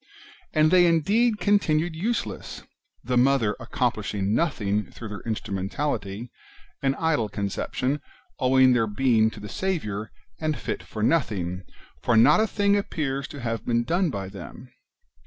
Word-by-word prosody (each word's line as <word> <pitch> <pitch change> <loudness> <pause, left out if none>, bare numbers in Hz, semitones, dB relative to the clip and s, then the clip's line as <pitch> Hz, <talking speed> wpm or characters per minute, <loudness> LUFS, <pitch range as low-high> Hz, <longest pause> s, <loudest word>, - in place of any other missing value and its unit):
And 155 +1 +3
they 180 -1 +6
indeed 210 +8 +3
continued 175 -6 +2
useless, 175 - -3 0.4
the 125 +1 0
Mother 125 -4 +3
accomplishing 110 -5 -1
nothing 105 -9 0
through 110 - -9
their 105 -3 -7
instrumentality,^ 105 +1 -3 0.3
— - - -29
an 135 0 +1
idle 150 -10 0
conception, 115 +8 -2 0.4
owing 130 -1 +5
their 115 -2 +2
being 110 0 +3
to - - -11
the 105 - -7
Saviour, 110 - -3 0.3
and 155 -2 -1
fit - - -4
for 110 - -6
nothing, 100 - 0 0.4
for 115 - +2
not 115 - +6
a 220 - +3
thing 200 -1 +2
appears 145 -8 -2
to 140 - -9
have 115 -2 -3
been 120 0 +1
done 175 +8 +1
by 100 -7 -4
them. 95 +6 -10
125 Hz, 145 wpm, -25 LUFS, 105-160 Hz, 0.4 s, they